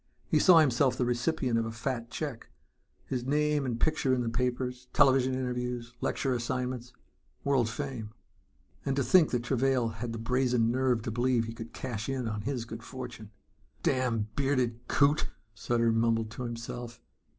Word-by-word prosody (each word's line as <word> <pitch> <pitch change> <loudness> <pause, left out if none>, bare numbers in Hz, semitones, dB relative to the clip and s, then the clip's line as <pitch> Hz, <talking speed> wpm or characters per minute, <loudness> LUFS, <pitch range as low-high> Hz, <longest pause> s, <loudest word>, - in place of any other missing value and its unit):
He - - +2
saw 180 -3 +7
himself 130 -3 +4
the 125 - +1
recipient 120 0 +1
of 115 - 0
a - - -4
fat 115 +1 -3
check, 140 -3 -5 0.6
his 125 -2 -2
name 150 +1 +1
and 120 -2 -2
picture 140 -4 +2
in 125 - 0
the 115 - -1
papers, 125 +1 -2
television 130 -2 +4
interviews, 125 -2 -3
lecture 135 -2 0
assignments, 125 0 -3 0.5
world 135 -5 +2
fame... 120 -3 -4 0.7
And 135 - 0
to 140 - +1
think 180 -1 +5
that 120 -1 -1
Travail 130 -1 +1
had 115 +1 -5
the 115 - -4
brazen 125 0 +2
nerve 125 -2 +1
to 115 - -3
believe 120 0 +1
he 115 - -6
could 115 0 -8
cash 115 -2 -4
in 130 -3 -2
on 105 -1 -3
his 120 +1 -3
good 115 0 -8
fortune! 125 -3 -8 0.5
"Damned 115 -5 0
bearded 130 -4 0
coot!" 145 +2 +3 0.3
Sutter 115 +3 +1
mumbled 115 -1 +1
to 125 +2 -5
himself. 120 0 -6
125 Hz, 165 wpm, -30 LUFS, 115-130 Hz, 0.7 s, saw